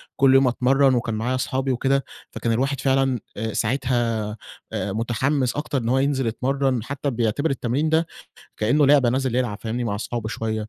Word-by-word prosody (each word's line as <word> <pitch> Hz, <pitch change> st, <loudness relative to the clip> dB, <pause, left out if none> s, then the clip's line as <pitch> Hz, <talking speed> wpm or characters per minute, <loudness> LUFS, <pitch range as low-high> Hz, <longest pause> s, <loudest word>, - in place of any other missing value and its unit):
كل 135 Hz, -1 st, +4 dB
يوم 135 Hz, -1 st, +5 dB
أتمرَّن 130 Hz, +2 st, +3 dB
وكان 115 Hz, -2 st, -1 dB
معايا 120 Hz, +4 st, -1 dB
أصحابي 130 Hz, +1 st, -1 dB
وكده، 135 Hz, +2 st, +1 dB, 0.3 s
فكان 115 Hz, -, -2 dB
الواحد 135 Hz, +3 st, 0 dB
فعلًا 135 Hz, -2 st, +2 dB, 0.2 s
آآ 110 Hz, 0 st, -3 dB
ساعتها 115 Hz, -3 st, -1 dB, 0.4 s
مُتحِّمس 120 Hz, +6 st, -1 dB
أكتر 145 Hz, -1 st, -2 dB
إن 115 Hz, -2 st, -1 dB
هو 130 Hz, +1 st, +3 dB
ينزل 135 Hz, -3 st, 0 dB
يتمرن، 130 Hz, 0 st, 0 dB
حتى 140 Hz, +2 st, -3 dB
بيعتبر 120 Hz, +6 st, 0 dB
التمرين 135 Hz, +3 st, -1 dB
ده، 160 Hz, +1 st, +2 dB, 0.5 s
كأنّه 135 Hz, +7 st, +3 dB
لعبة 140 Hz, -4 st, +5 dB
نازل 130 Hz, 0 st, 0 dB
يلعب، 120 Hz, -5 st, -1 dB
فاهمني؟ 120 Hz, +2 st, -2 dB
مع 100 Hz, -3 st, -1 dB
أصحابه 110 Hz, +1 st, -4 dB
شويّة 110 Hz, -1 st, -3 dB
130 Hz, 170 wpm, -23 LUFS, 115-135 Hz, 0.5 s, يوم